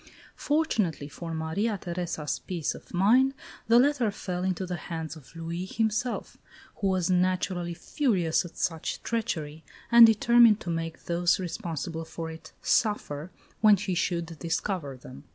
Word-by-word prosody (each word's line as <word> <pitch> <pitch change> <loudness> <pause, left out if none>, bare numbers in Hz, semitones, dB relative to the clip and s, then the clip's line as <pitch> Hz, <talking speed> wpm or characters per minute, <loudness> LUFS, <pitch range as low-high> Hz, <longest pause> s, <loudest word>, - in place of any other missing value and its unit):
Fortunately 220 - 0
for 165 +3 -7
Maria 165 +7 -1
Theresa's 170 -4 -3
peace 170 -5 -3
of - - -13
mind 245 +9 +4 0.3
the 230 +1 +6
letter 255 -3 +3
fell 180 -3 -4
into 185 0 -1
the 180 0 -3
hands 160 -2 -5
of 150 0 -15
Louis 165 +2 -4
himself, 225 +4 -2 0.4
who 200 - 0
was 185 -2 +1
naturally 180 -1 0
furious 185 - +1
at 175 - -11
such 165 -3 -2
treachery 160 -10 -3 0.3
and 235 -1 +10
determined 225 0 +5
to 175 - -3
make 165 0 -4
those 175 +1 +2
responsible 165 -3 -4
for 165 0 -6
it 160 - -11
suffer 175 -8 0 0.3
when 210 -2 +6
he 190 0 -2
should 170 -2 -2
discover 165 -4 -2
them. 130 0 -12
180 Hz, 145 wpm, -28 LUFS, 165-215 Hz, 0.4 s, and